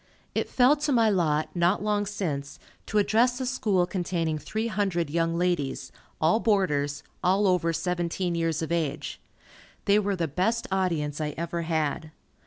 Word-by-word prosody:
It - - -1
fell 255 +3 +5
to 295 0 -1
my 230 -4 +4
lot, 155 -4 0
not 175 +4 +2
long 205 -1 0
since, 145 -9 -3 0.3
to 215 - -1
address 235 +5 +3
a 260 - -2
School 210 -8 +1
containing 175 -4 -2
three 220 +8 -3
hundred 195 -8 -1
young 165 +1 0
ladies, 175 -6 -1 0.3
all 165 +8 +3
boarders, 150 -11 +1 0.2
all 195 +3 +3
over 180 -3 +2
seventeen 175 +1 -1
years 165 -1 0
of 160 - -4
age. 160 -5 -2 0.6
They 205 0 +5
were 200 -1 0
the 170 -3 -1
best 215 +10 0
audience 160 -6 0
I 150 -1 -3
ever 170 +1 -2
had. 160 -1 -1
175 Hz, 160 wpm, -27 LUFS, 160-205 Hz, 0.6 s, fell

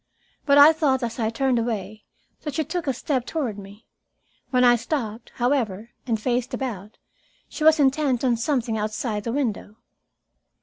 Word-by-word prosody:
But 280 0 +5
I 290 +3 +9
thought, 280 -5 +1
as 235 +1 -4
I 220 -1 +1
turned 250 +1 +1
away, 215 -2 -4 0.4
that 295 - -5
she 315 - +1
took 325 +2 -4
a - - +3
step 255 +1 -2
toward 245 -8 -3
me. 200 +3 -13 0.6
When 250 -1 +2
I 240 -1 +6
stopped, 230 -2 -4
however, 240 -4 -1 0.2
and 225 -3 0
faced 245 +2 -1
about, 215 -6 -6 0.5
she 305 - -6
was 315 0 +6
intent 270 -2 +2
on 250 -2 +3
something 235 -2 -1
outside 215 0 -3
the 230 - -1
window. 230 -6 -3
245 Hz, 165 wpm, -24 LUFS, 220-280 Hz, 0.6 s, I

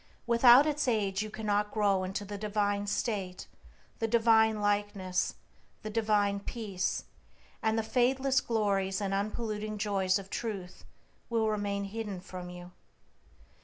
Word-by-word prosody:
Without 240 +3 +7
its 300 -2 0
aid 205 -4 +1
you 215 - -4
cannot 210 -1 -1
grow 200 -3 +2
into 190 +2 -4
the 205 +1 -6
divine 205 0 -1
state, 200 -3 -2 0.5
the 225 - 0
divine 220 -1 +4
likeness, 205 -3 0 0.5
the 215 - -5
divine 205 -2 +1
peace, 200 -3 -3 0.6
and 220 0 +1
the 225 - +1
fadeless 260 +3 +2
glories 200 -4 0
and 195 -1 -2
unpolluting 215 +1 -2
joys 195 -2 +1
of 195 -1 -9
Truth 195 -6 -5 0.4
will 225 -2 +1
remain 205 -1 -1
hidden 205 -1 -5
from 180 0 -8
you. 180 0 -10
210 Hz, 130 wpm, -30 LUFS, 195-220 Hz, 0.6 s, Without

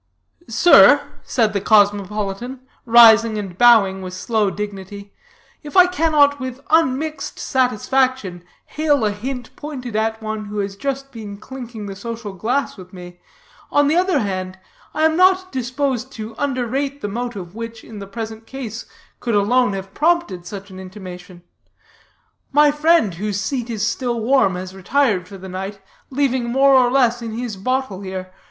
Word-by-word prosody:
"Sir," 260 - +7 0.2
said 220 -4 0
the 200 - -1
cosmopolitan, 205 +4 +1 0.3
rising 230 -1 +7
and 195 -4 -5
bowing 200 -4 +5
with 185 -1 -7
slow 215 +1 0
dignity, 200 0 -7 0.5
"if 300 +4 -5
I 365 - +9
cannot 305 -5 +2
with 260 -1 -6
unmixed 310 -1 0
satisfaction 255 -6 0 0.2
hail 295 -6 +1
a 210 - +1
hint 245 +4 -6
pointed 255 -6 -7
at 220 0 0
one 215 -1 -5
who 205 +1 -7
has 200 -1 -2
just 275 +4 -4
been 210 -4 -8
clinking 235 -2 -8
the 195 -1 -7
social 225 0 -6
glass 235 +9 -2
with 185 0 -13
me, 175 -1 -11 0.5
on 290 0 +3
the 305 - +2
other 365 -1 +2
hand, 190 -5 -3 0.3
I 310 +1 +1
am 320 0 +3
not 370 +1 +3
disposed 260 0 -2
to 220 -1 -7
underrate 275 +1 -2
the - - -3
motive 205 -5 -5
which, 230 0 -7
in 215 -2 -10
the 200 - -8
present 225 +1 -7
case, 240 -4 -7 0.3
could 235 -3 -1
alone 210 +2 +2
have 195 0 -7
prompted 315 - 0
such 200 -1 -8
an 185 - -10
intimation. 185 -2 -10 1.1
My 295 +1 +5
friend, 300 - +3
whose 200 +3 -3
seat 240 +3 -3
is 215 -2 -1
still 240 +1 -2
warm, 225 -5 +2
has 185 +1 -6
retired 195 -1 0
for 195 - -10
the 190 0 -10
night, 195 +2 -6 0.3
leaving 260 -2 0
more 270 +3 +4
or 255 -2 +5
less 245 -2 +2
in 225 -1 -5
his 235 -2 -4
bottle 255 -1 -2
here. 185 -1 -6
225 Hz, 160 wpm, -20 LUFS, 200-265 Hz, 1.1 s, I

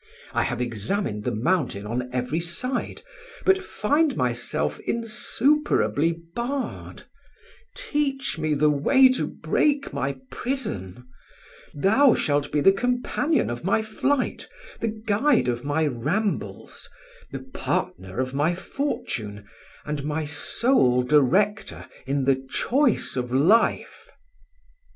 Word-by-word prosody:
I - - +2
have 125 -2 -2
examined 115 - -2
the 125 -3 -1
mountain 125 - 0
on 125 +3 -3
every 125 +5 -1
side, 180 +10 -3 0.4
but 385 0 +4
find 295 - +1
myself 120 - -1
insuperably 230 - +1 0.2
barred—teach 280 - -5
me 155 -1 0
the 150 +1 +3
way 260 - +5
to 255 - 0
break 290 -1 0
my 135 0 -2
prison; 125 - -4 0.7
thou 220 - +4
shalt 145 -1 0
be 150 - +1
the 195 - +7
companion 250 - 0
of 120 - -6
my 195 +4 +1
flight, 255 +5 -1 0.3
the 230 - -1 0.2
guide 220 - +2
of 120 0 -1
my 145 +2 0
rambles, 155 - -3 0.4
the - - -4 0.2
partner 95 +4 -3
of 130 0 -2
my 150 +5 +1
fortune, 110 - -4 0.4
and 150 -2 -3
my 155 +1 -2
sole 145 - +2
director 190 +10 +2 0.2
in 140 0 0
the 135 0 +1
choice 265 - +1
of 125 -1 -3
life. 170 - +2
160 Hz, 115 wpm, -24 LUFS, -, 0.7 s, the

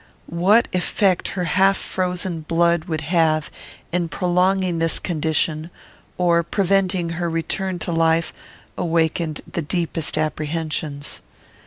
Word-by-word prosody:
What 195 +8 +3
effect 185 +1 +1
her 180 - 0
half 195 +4 +3
frozen 180 -2 -2
blood 170 +1 +2
would 160 -3 -3
have 155 -1 +1 0.4
in 175 -1 0
prolonging 180 0 +1
this 165 0 +2
condition, 160 -1 0 0.5
or 170 -1 +3
preventing 185 0 +1
her 170 +1 -2
return 180 +3 -2
to 175 - -3
life, 165 0 +2 0.5
awakened 165 -2 0
the 170 - -4
deepest 165 -1 -2
apprehensions. 155 -1 -3
170 Hz, 115 wpm, -21 LUFS, 160-180 Hz, 0.5 s, What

